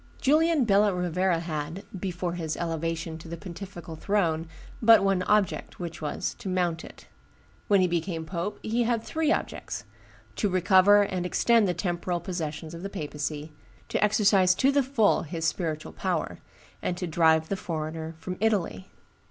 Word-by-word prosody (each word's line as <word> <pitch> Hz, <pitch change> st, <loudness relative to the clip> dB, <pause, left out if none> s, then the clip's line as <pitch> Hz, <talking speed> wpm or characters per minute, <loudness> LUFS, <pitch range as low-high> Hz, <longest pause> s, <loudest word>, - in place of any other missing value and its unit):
Julian 310 Hz, 0 st, +3 dB
Bella 205 Hz, -1 st, +4 dB
Rovera 180 Hz, 0 st, 0 dB
had, 165 Hz, +3 st, -4 dB, 0.2 s
before 180 Hz, -2 st, -3 dB
his 160 Hz, -3 st, -3 dB
elevation 165 Hz, -1 st, -3 dB
to 165 Hz, -, -11 dB
the 170 Hz, +1 st, -6 dB
pontifical 175 Hz, -1 st, -8 dB
throne, 165 Hz, -3 st, 0 dB, 0.3 s
but 225 Hz, -3 st, +7 dB
one 195 Hz, -2 st, +2 dB
object, 210 Hz, +1 st, 0 dB
which 170 Hz, -2 st, -6 dB
was, 150 Hz, -, -2 dB
to 195 Hz, -, -5 dB
mount 175 Hz, -3 st, 0 dB
it. -, -, -13 dB, 0.6 s
When 200 Hz, -2 st, +4 dB
he 185 Hz, -, +4 dB
became 170 Hz, -1 st, -2 dB
pope, 175 Hz, +4 st, -3 dB
he 230 Hz, +2 st, 0 dB
had 235 Hz, -1 st, +1 dB
three 315 Hz, -1 st, 0 dB
objects: -, -, -3 dB, 0.5 s
to 205 Hz, -, +1 dB
recover 190 Hz, +2 st, +5 dB
and 185 Hz, -3 st, -2 dB
extend 225 Hz, +4 st, +3 dB
the 180 Hz, -, 0 dB
temporal 175 Hz, 0 st, -2 dB
possessions 160 Hz, -3 st, -5 dB
of 170 Hz, -, -7 dB
the 195 Hz, -, -4 dB
papacy, 150 Hz, -3 st, -4 dB, 0.4 s
to -, -, +1 dB
exercise 200 Hz, -3 st, +4 dB
to 265 Hz, +8 st, +3 dB
the 280 Hz, 0 st, +3 dB
full 250 Hz, -6 st, +2 dB
his 165 Hz, +1 st, -4 dB
spiritual 160 Hz, -2 st, -2 dB
power, -, -, -2 dB, 0.4 s
and 175 Hz, -, -2 dB
to 180 Hz, -, -3 dB
drive 160 Hz, -1 st, +3 dB
the 195 Hz, -, 0 dB
foreigner 160 Hz, -2 st, -4 dB
from 180 Hz, +3 st, -6 dB
Italy. 200 Hz, -, 0 dB
180 Hz, 160 wpm, -27 LUFS, 165-200 Hz, 0.6 s, but